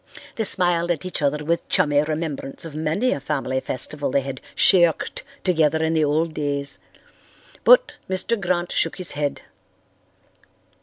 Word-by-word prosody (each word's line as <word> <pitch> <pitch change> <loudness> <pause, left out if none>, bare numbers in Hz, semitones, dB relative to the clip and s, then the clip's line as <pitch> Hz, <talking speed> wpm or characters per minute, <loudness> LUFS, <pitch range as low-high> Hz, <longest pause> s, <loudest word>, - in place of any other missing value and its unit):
They 220 - -1
smiled 175 -3 +2
at 175 0 -1
each 185 - -2
other 150 +1 0
with 170 +2 -1
chummy 145 -1 +3
remembrance 155 -2 -4
of 160 - -8
many 160 +11 0
a - - -1
family 135 -2 -2
festival 140 +3 -3
they 140 - +1
had 135 -1 -6
"shirked" 175 -4 +3 0.2
together 160 -3 +2
in 160 0 +1
the 160 -1 +2
old 155 +2 0
days. 140 -2 -3 0.8
But - - +5
Mr. 200 +4 0
Grant 175 -1 -1
shook - - 0
his 185 -2 -4
head. 145 -1 -3
160 Hz, 150 wpm, -22 LUFS, 145-175 Hz, 0.8 s, But